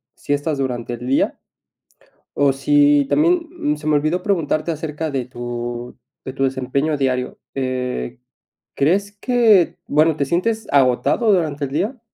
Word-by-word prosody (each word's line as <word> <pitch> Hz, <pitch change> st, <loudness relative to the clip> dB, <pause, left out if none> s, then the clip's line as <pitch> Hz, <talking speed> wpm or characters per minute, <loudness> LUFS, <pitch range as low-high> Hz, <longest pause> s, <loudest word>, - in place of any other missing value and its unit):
siestas 145 Hz, +1 st, -2 dB
durante 120 Hz, -3 st, -3 dB
el 120 Hz, +1 st, -7 dB
día. 135 Hz, -, +1 dB, 1.0 s
Oh, 140 Hz, -1 st, +3 dB
sí, 145 Hz, +1 st, +3 dB
también 335 Hz, -, +1 dB
se 150 Hz, +1 st, -7 dB
me 155 Hz, -, +3 dB
olvidó 155 Hz, +5 st, 0 dB
preguntarte 165 Hz, -5 st, 0 dB
acerca 155 Hz, 0 st, -4 dB
de 135 Hz, -3 st, -2 dB
tu 120 Hz, 0 st, -6 dB, 0.3 s
de 130 Hz, -, -5 dB
tu 135 Hz, -, -2 dB
desempeño 135 Hz, +3 st, -1 dB
diario, 130 Hz, -2 st, -1 dB, 0.2 s
eh, 125 Hz, -, -3 dB, 0.6 s
¿crees 195 Hz, +8 st, +1 dB
que 225 Hz, -7 st, +3 dB
bueno, 155 Hz, +1 st, +3 dB
te 145 Hz, -, 0 dB
sientes 215 Hz, +9 st, -1 dB
agotado 140 Hz, -, +3 dB
durante 155 Hz, -6 st, 0 dB
el -, -, -9 dB
día? 210 Hz, -, -2 dB
145 Hz, 140 wpm, -20 LUFS, 130-170 Hz, 1.0 s, Oh